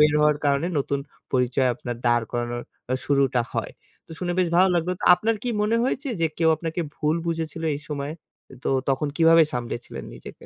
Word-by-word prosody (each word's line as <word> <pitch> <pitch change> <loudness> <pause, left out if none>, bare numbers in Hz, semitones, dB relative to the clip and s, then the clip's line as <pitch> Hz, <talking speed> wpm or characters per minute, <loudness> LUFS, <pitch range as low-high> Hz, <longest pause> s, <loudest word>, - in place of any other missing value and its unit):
বের 150 0 +6
হওয়ার 150 -1 +4
কারণে 140 +2 +2
নতুন 140 0 -1 0.3
পরিচয় 125 0 +2
আপনার 120 0 -5
দাঁড় 120 -1 +3
করানোর 120 0 -2 0.4
শুরুটা 135 -3 +2
হয়। - - -3 0.3
তো - - -22
শুনে 175 -1 -2
বেশ 180 -2 +3
ভালো 185 +2 +6
লাগলো। 175 +1 +1
তো - - -3
আপনার 220 +6 0
কি 245 - -2
মনে 215 +2 +2
হয়েছে 270 +2 -1
যে 165 - +4
কেউ 165 -1 +4
আপনাকে 165 +2 -3 0.2
ভুল 155 +2 +1
বুঝেছিল 165 -1 -3
এই - - -9
সময়ে? 145 +1 -3 0.5
তো - - 0 0.2
তখন 140 +2 +1
কিভাবে 165 0 +6
সামলেছিলেন 120 0 -5
নিজেকে? - - -10
150 Hz, 185 wpm, -24 LUFS, 130-170 Hz, 0.5 s, বের